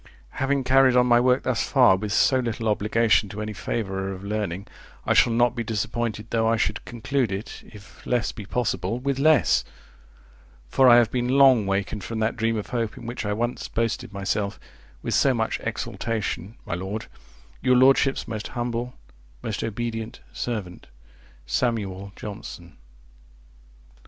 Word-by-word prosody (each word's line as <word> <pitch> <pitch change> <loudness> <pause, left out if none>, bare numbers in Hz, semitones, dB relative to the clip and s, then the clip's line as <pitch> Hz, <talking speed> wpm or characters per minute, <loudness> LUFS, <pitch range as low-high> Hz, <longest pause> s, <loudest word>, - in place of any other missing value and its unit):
Having 140 0 +1
carried 130 0 +5
on 125 0 +5
my 120 -1 +5
work 125 +1 +3
thus 125 -3 0
far 125 -8 +6
with 105 +2 -4
so 130 +5 +4
little 115 -2 -2
obligation 110 0 +2
to 100 - -7
any 110 0 -4
favourer 95 -3 -3
of 95 0 -8
learning, 100 -2 -3 0.4
I - - +3
shall 120 - +5
not 120 0 +3
be 120 - -2
disappointed 110 0 -2
though 115 -1 +2
I 115 0 +3
should 105 0 -1
conclude 120 0 -1
it, 95 +3 -6
if 100 -2 -15
less 120 -1 +1
be 105 -5 -9
possible, 115 -2 -1
with 135 +1 -2
less; 155 -3 +4 1.0
for 130 - +5
I 120 - +9
have 120 -3 +4
been 125 -1 -1
long 130 -5 +5
wakened 100 +1 -2
from 115 +5 -5
that 110 0 0
dream 115 -1 0
of 105 - -5
hope, 115 -3 -2
in - - -10
which 120 -2 -4
I 105 - 0
once 120 +3 -2
boasted 115 -2 -2
myself 100 +1 -2 0.4
with - - -2
so 135 -2 +3
much 110 -1 -1
exultation, 110 -3 -3
My - - -4
Lord, 95 +5 -4 0.6
Your 125 - +4
lordship's 135 +1 +4
most 110 -2 -4
humble, 120 0 -3 0.5
most 105 -3 -3
obedient 115 0 -4
servant, 105 -7 -5 0.6
Sam. 115 - +1 0.4
Johnson. 95 -6 -9
115 Hz, 160 wpm, -24 LUFS, 105-125 Hz, 1.0 s, I